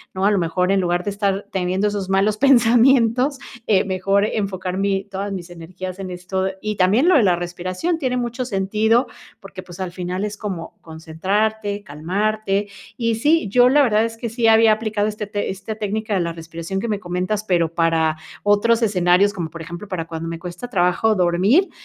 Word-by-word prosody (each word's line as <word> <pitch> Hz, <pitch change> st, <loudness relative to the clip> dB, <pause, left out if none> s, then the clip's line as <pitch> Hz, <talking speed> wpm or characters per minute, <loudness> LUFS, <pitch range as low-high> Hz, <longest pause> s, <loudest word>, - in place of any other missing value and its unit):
¿no? 190 Hz, +1 st, 0 dB
A 205 Hz, -, +4 dB
lo 200 Hz, -, +2 dB
mejor, 180 Hz, +2 st, 0 dB
en 195 Hz, -1 st, +2 dB
lugar 175 Hz, 0 st, 0 dB
de 205 Hz, -, -2 dB
estar 200 Hz, -1 st, -1 dB
teniendo 190 Hz, +2 st, 0 dB
esos 200 Hz, -2 st, -3 dB
malos 200 Hz, +2 st, +2 dB
pensamientos, 250 Hz, +1 st, +4 dB, 0.3 s
eh, 195 Hz, -3 st, +4 dB
mejor 195 Hz, +2 st, +1 dB
enfocar 190 Hz, -4 st, -3 dB
mi, 195 Hz, -1 st, 0 dB
todas 200 Hz, 0 st, -5 dB
mis 175 Hz, -2 st, -7 dB
energías 180 Hz, +2 st, -8 dB
en 190 Hz, -, -5 dB
esto. 185 Hz, +1 st, -3 dB, 0.2 s
Y 215 Hz, -1 st, -3 dB
también 205 Hz, -, +3 dB
lo 365 Hz, -, +5 dB
de 280 Hz, -, +6 dB
la 180 Hz, -3 st, +3 dB
respiración 185 Hz, -, -3 dB
tiene 255 Hz, -3 st, -1 dB
mucho 245 Hz, +1 st, -3 dB
sentido, 220 Hz, +3 st, +1 dB, 0.3 s
porque, 195 Hz, -1 st, -10 dB
pues, 175 Hz, +1 st, -11 dB
al 180 Hz, -2 st, -3 dB
final 180 Hz, +2 st, -4 dB
es 210 Hz, 0 st, -4 dB
como 185 Hz, -6 st, -6 dB
concentrarte, 200 Hz, +6 st, -2 dB
calmarte. 200 Hz, +5 st, -2 dB, 0.3 s
Y 230 Hz, -2 st, 0 dB
sí, 295 Hz, 0 st, +2 dB
yo 245 Hz, +3 st, +5 dB
la 290 Hz, +3 st, +5 dB
verdad 220 Hz, -3 st, +3 dB
es 225 Hz, -, -5 dB
que 235 Hz, 0 st, -4 dB
sí 230 Hz, 0 st, 0 dB
había 225 Hz, 0 st, +6 dB
aplicado 215 Hz, -1 st, 0 dB
este 210 Hz, -1 st, -5 dB, 0.2 s
esta 195 Hz, +3 st, -6 dB
técnica 215 Hz, +1 st, -3 dB
de 190 Hz, -, +1 dB
la 170 Hz, -1 st, -2 dB
respiración 165 Hz, +3 st, -6 dB
que 235 Hz, -, -3 dB
me 205 Hz, -2 st, -1 dB
comentas, 185 Hz, +4 st, -2 dB
pero, 170 Hz, -4 st, 0 dB
para 165 Hz, -2 st, +1 dB, 0.3 s
otros 225 Hz, +3 st, +3 dB
escenarios, 195 Hz, -1 st, +3 dB
como 170 Hz, -6 st, -4 dB
por 165 Hz, +1 st, -9 dB
ejemplo, 175 Hz, +4 st, -8 dB
para 175 Hz, -4 st, -4 dB
cuando 165 Hz, 0 st, -6 dB
me 165 Hz, -, -5 dB
cuesta 180 Hz, +8 st, -7 dB
trabajo 185 Hz, +2 st, +2 dB
dormir, 190 Hz, -, +3 dB
195 Hz, 190 wpm, -21 LUFS, 180-220 Hz, 0.3 s, de